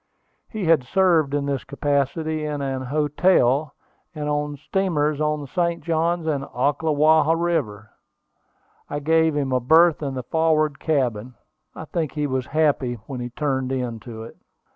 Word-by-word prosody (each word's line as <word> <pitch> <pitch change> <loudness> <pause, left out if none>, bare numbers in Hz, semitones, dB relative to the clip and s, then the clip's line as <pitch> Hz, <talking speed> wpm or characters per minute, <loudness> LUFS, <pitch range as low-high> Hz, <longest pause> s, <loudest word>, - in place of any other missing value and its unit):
He 215 -4 -4
had 160 -5 +4
served 160 -2 +2
in 145 -1 -1
this 140 -2 -2
capacity 145 +3 -1
in 150 -2 -3
an 135 -1 -3
hotel, 145 0 +2 0.4
and 150 -1 -4
on 145 0 -2
steamers 155 -3 -1
on 150 0 0
the 140 - -8
St. 170 +3 -1
Johns 165 +1 0
and 145 -4 -1
Ocklawaha 155 +3 +2
rivers. 155 -12 -1 1.0
I 145 - -3
gave 160 +1 +2
him 140 -2 -1
a 130 - +2
berth 160 +6 +4
in 140 -3 -3
the 130 - -4
forward 155 0 +1
cabin. 125 -6 -1 0.4
I 160 - -7
think 160 -2 -3
he 150 -1 -1
was 130 -2 -2
happy 145 -5 +1
when 135 -3 -6
he 120 0 -4
turned 130 0 -2
into 115 -3 -5
it. 115 - -12
150 Hz, 155 wpm, -23 LUFS, 135-160 Hz, 1.0 s, had